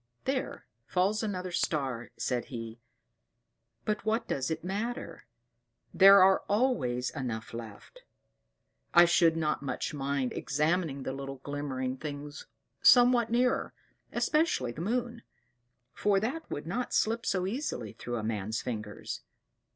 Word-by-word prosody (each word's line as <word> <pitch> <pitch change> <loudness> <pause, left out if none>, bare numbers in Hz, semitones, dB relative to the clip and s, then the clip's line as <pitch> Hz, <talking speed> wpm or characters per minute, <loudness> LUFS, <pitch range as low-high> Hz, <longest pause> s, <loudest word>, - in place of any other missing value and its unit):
"There 265 -1 -2 0.2
falls 195 +4 +1
another 185 -4 -3
star," 135 -8 -1
said 125 -1 -1
he: 115 -2 -7 1.1
"but 215 -1 -1
what 225 +2 0
does 135 -1 -1
it 160 0 -3
matter; 195 - -4 0.7
there 195 0 +9
are 190 0 +5
always 200 - +1
enough 120 -7 -5
left. 115 - -9 0.9
I 175 0 +9
should 170 -1 +4
not 155 -2 0
much 140 +1 -3
mind 140 -2 -1
examining 150 -1 0
the 130 - -3
little 135 0 -6
glimmering 135 -3 -3
things 145 +1 -7 0.3
somewhat 245 -2 +6
nearer, 245 +2 +1 0.4
especially 305 - +1
the 150 - -7
moon; 235 +4 -2 0.7
for 200 -1 +2
that 255 +10 -3
would 145 - -5
not 240 +9 -2
slip 225 +1 +1
so 185 -2 0
easily 190 - -3
through 120 - -5
a 110 - -3
man's 110 0 -2
fingers. 105 - -5
160 Hz, 130 wpm, -30 LUFS, 130-215 Hz, 1.1 s, there